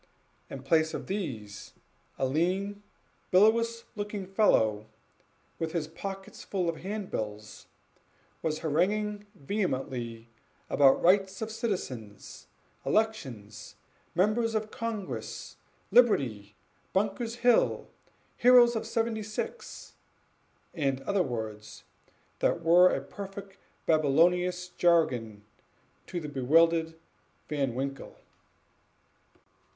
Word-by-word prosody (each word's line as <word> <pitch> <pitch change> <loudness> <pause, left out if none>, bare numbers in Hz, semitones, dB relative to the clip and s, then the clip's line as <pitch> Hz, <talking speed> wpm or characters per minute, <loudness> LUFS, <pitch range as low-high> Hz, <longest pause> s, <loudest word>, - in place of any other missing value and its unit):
In 135 -1 -8
place 160 +3 +2
of - - -5
these, 115 - -5 0.4
a 135 - 0
lean, 185 +8 -1 0.5
bilious 230 +4 +3
looking 205 -1 -4
fellow, 110 - +2 0.7
with 160 -1 -3
his 165 -3 -1
pockets 195 +4 -8
full 185 -3 -2
of 165 -1 -1
hand 200 +1 -5
bills, 105 0 -6 0.7
was 155 -1 -2
haranguing 205 +6 0
vehemently 130 - -3 0.4
about 135 -1 +5
rights 190 +1 +3
of 220 - -5
citizens 130 - -5 0.4
elections 115 - -2 0.4
members 220 +5 +2
of 215 0 -2
congress 225 -4 -5 0.3
liberty 120 - +3 0.4
Bunker's 210 +4 -1
Hill 245 -2 +3 0.5
heroes 245 -1 +6
of 225 - -3
seventy 225 -1 -1
six 215 - -6 0.8
and 135 -5 -1
other 200 +3 +1
words, 110 -6 -5 0.6
which - - +1
were 175 +2 +6
a - - -1
perfect 195 -1 -9 0.3
Babylonish 180 +4 +2
jargon 125 -13 +1 0.6
to 175 - -3
the 155 - -6
bewildered 160 +4 +3 0.5
Van 135 -5 -1
Winkle. 135 +1 -4
175 Hz, 95 wpm, -29 LUFS, 135-205 Hz, 0.8 s, heroes